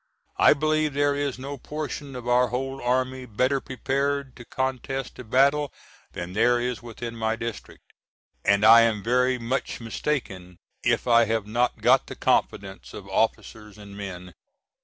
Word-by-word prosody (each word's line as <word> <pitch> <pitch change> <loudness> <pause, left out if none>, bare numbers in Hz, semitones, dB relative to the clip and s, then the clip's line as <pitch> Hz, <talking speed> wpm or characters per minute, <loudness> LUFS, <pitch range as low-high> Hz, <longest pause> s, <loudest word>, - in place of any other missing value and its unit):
I - - +7
believe 155 0 +1
there 145 0 +2
is 140 -2 -2
no 140 +1 -7
portion 145 -1 -6
of 125 -1 -7
our 125 +1 +4
whole 135 +2 -4
army 130 +1 -1
better 130 +5 +1
prepared 140 +1 -2
to 120 - -11
contest 130 0 -3
a - - -6
battle 140 +5 +2 0.4
than 85 +1 -6
there 120 +4 +3
is 120 -3 -3
within 115 0 -7
my 110 0 -1
district, 115 -1 -7 0.6
and 100 +1 +3
I 115 +1 +9
am 110 -3 +1
very 125 +2 +2
much 125 +3 -3
mistaken 105 - -4 0.3
if - - +1
I 115 -1 +5
have 110 -1 -1
not 120 +4 -1
got - - +4
the - - -7
confidence 95 0 -1
of 100 -2 -9
officers 105 +1 -2
and 100 -1 -12
men. 90 -3 -8
125 Hz, 160 wpm, -25 LUFS, 110-135 Hz, 0.6 s, I